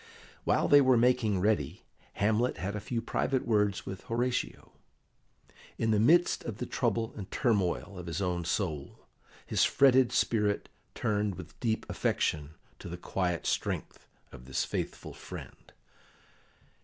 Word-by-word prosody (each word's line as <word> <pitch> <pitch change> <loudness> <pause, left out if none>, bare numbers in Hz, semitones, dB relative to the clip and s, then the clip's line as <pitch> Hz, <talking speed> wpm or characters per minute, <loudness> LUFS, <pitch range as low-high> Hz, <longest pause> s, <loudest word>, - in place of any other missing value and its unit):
While - - +2
they 145 0 +7
were 130 -2 +5
making 115 -5 +3
ready, 105 +2 0 0.3
Hamlet 110 +4 +1
had 95 +4 -3
a - - -2
few 115 +2 -3
private 130 +2 0
words 105 -3 +1
with 95 -1 -6
Horatio. 120 +2 -2 1.1
In 115 - +1
the 105 - +3
midst 170 +10 +4
of 115 -4 -5
the 125 - -3
trouble 115 -2 -1
and 100 -3 -7
turmoil 100 -5 0
of 90 - -8
his 85 +1 -3
own 90 -2 -1
soul, 80 -5 -3 0.4
his - - +2
fretted 130 -2 +5
spirit 105 -4 +1 0.3
turned 105 -2 0
with - - -11
deep 110 -2 -1
affection 75 0 -1 0.2
to - - -8
the 85 - -5
quiet 90 -1 -2
strength - - -2 0.2
of 60 - -12
this 65 - -1
faithful - - -4
friend. - - -10
105 Hz, 145 wpm, -30 LUFS, 95-120 Hz, 1.1 s, they